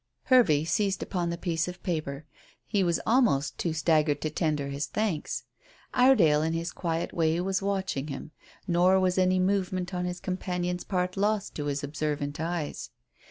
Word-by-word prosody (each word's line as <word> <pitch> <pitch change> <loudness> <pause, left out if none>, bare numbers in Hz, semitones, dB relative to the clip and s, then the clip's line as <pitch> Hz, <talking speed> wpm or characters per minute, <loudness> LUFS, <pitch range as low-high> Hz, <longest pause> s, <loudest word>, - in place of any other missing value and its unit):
Hervey 200 - +4
seized 195 +3 0
upon 175 -3 -2
the 170 - -3
piece 170 -1 -1
of 180 0 -8
paper. 155 -4 -3 0.4
He 200 -3 +1
was 170 -2 +1
almost 220 - +2
too 170 - 0
staggered 155 -2 +2
to 155 - -2
tender 150 -3 -1
his 140 +1 -3
thanks. 210 -8 -2 0.5
Iredale 220 - +5
in 160 +1 0
his 165 +1 -2
quiet 165 -1 -3
way 165 0 +1
was 190 +2 0
watching, 185 -8 -3 0.4
nor 180 +2 +4
was 185 0 +2
any 185 0 +3
movement 185 -1 0
on 180 0 -1
his 180 0 -4
companion's 180 -1 -3
part 180 -1 -2
lost 205 0 0
to 145 - -4
his 145 0 -2
observant 145 0 -3
eyes. 160 - -3
175 Hz, 160 wpm, -28 LUFS, 155-190 Hz, 0.5 s, Iredale